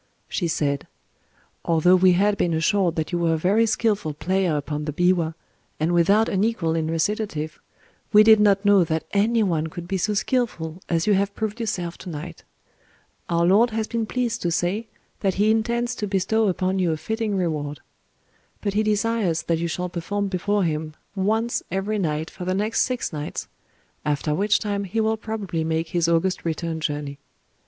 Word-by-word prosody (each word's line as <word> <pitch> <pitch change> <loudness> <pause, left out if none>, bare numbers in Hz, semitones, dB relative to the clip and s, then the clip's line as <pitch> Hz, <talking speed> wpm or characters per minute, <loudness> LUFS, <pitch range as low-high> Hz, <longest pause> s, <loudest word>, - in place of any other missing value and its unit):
She 175 - -1
said:— 140 -3 -1 0.8
"Although 170 +2 +4
we 185 0 +5
had 200 +3 +3
been 170 -4 0
assured 175 +1 +2
that 160 +1 -2
you 175 - 0
were 165 -1 +2
a - - -1
very 205 +8 +3
skillful 210 -9 0
player 185 -1 0
upon 150 +1 -3
the 150 - -2
biwa, 170 0 +1 0.4
and 160 +2 +1
without 200 +6 +4
an 195 0 +1
equal 200 -8 0
in 160 -1 -1
recitative, 165 -2 -2 0.5
we 210 +1 +8
did 220 0 +7
not 205 -1 +3
know 200 -2 +6
that 160 -1 -1
any 220 +3 +2
one 165 -5 0
could 175 +1 -8
be 190 +1 -1
so 210 +4 0
skillful 195 -8 -1
as 165 -1 +1
you 210 - +4
have 200 +1 0
proved 220 +1 -3
yourself 180 -7 -3
to 185 - -8
night. 165 +2 -7 0.9
Our 170 0 +2
lord 210 +7 +5
has 220 -1 -2
been 230 -1 -2
pleased 245 -1 -1
to 175 - 0
say 180 +6 -1 0.3
that 195 -2 0
he 210 +3 +3
intends 235 +2 0
to 210 - -2
bestow 205 +3 +1
upon 185 0 0
you 180 -3 +2
a 160 - -1
fitting 220 +5 -2
reward. 150 -5 -2 0.8
But 200 -2 -2
he 210 - +2
desires 210 -5 0
that 165 -1 0
you 170 - -1
shall 180 +2 -3
perform 195 +4 -3
before 205 +2 0
him 155 -2 -2 0.2
once 220 +5 0
every 195 +4 -1
night 155 -2 -2
for 185 - -8
the 185 +1 -1
next 215 +3 0
six 250 -8 -3
nights—after 150 0 -5
which 205 +5 +2
time 200 -1 -2
he 195 +4 -2
will 220 0 +2
probably 210 -7 -4
make 160 0 -1
his 170 -2 +1
august 170 +3 +1
return 165 0 -2
journey. 145 -2 -3
185 Hz, 185 wpm, -23 LUFS, 165-210 Hz, 0.9 s, we